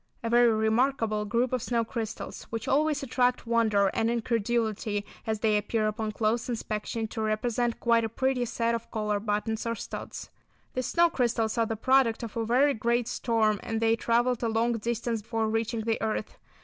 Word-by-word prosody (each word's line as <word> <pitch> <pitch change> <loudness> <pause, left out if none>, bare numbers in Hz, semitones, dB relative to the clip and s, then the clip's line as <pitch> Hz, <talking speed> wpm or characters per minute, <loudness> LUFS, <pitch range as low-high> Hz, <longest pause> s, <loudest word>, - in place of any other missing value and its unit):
A 230 - -2
very 240 0 +6
remarkable 220 0 +1
group 235 +4 0
of 255 - 0
snow 235 0 0
crystals, 225 -1 -5
which 225 -1 -5
always 295 +1 +2
attract 250 -1 +1
wonder 220 -4 +2
and 225 0 +1
incredulity, 225 -3 -1 0.2
as 220 -1 -1
they 215 -2 +3
appear 215 +1 0
upon 215 0 -2
close 225 +3 0
inspection 220 -1 -3
to 220 - -4
represent 230 +2 0
quite 230 -1 +3
a 225 - -1
pretty 260 +2 0
set 230 0 0
of 230 0 -4
collar 210 -2 -1
buttons 215 +1 -1
or 230 - -1
studs. - - -7 0.4
These 255 -1 -2
snow 340 0 +3
crystals 235 -5 0
are 225 - +2
the 225 - -2
product 255 0 +2
of 225 - -6
a 230 - 0
very 260 +6 +3
great 235 +1 0
storm, 225 -4 +1
and 225 -1 -3
they 225 0 +3
travelled 240 +1 +1
a 230 - 0
long 230 +2 +1
distance 235 0 -2
before 225 +1 -1
reaching 225 +1 -1
the 225 0 -1
earth. 215 -1 -3
230 Hz, 185 wpm, -28 LUFS, 220-240 Hz, 0.4 s, very